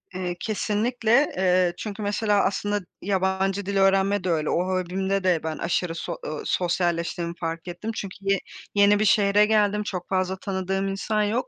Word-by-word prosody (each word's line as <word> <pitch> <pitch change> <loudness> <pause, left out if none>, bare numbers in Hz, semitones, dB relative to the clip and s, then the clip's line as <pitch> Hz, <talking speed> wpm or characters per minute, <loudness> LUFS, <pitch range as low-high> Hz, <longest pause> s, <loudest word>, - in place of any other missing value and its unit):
Eee, 180 -1 -3
kesinlikle, 225 +5 +1
eee, 185 -1 +3
çünkü 215 0 -6
mesela 205 0 +1
aslında 205 +1 0 0.2
yabancı 190 0 0
dil 200 0 -1
öğrenme 195 0 +3
de 185 - -1
öyle. 155 -2 0
O 175 - +1
hobimde 190 +1 -1
de 180 -4 +2
ben 160 -1 -3
aşırı 170 0 -1
so - - -4
eee, - - -3
sosyalleştiğimi 170 -1 -1
fark 165 +1 -4
ettim. 180 +6 -5
Çünkü 195 -3 -5
ye 195 0 +1 0.4
yeni 205 0 +5
bir 215 - +2
şehre 205 0 +4
geldim. 210 -1 +2
Çok 180 -4 -5
fazla 185 0 0
tanıdığım 195 0 -2
insan 210 +2 -1
yok. 220 +5 -1
195 Hz, 165 wpm, -25 LUFS, 180-205 Hz, 0.4 s, yeni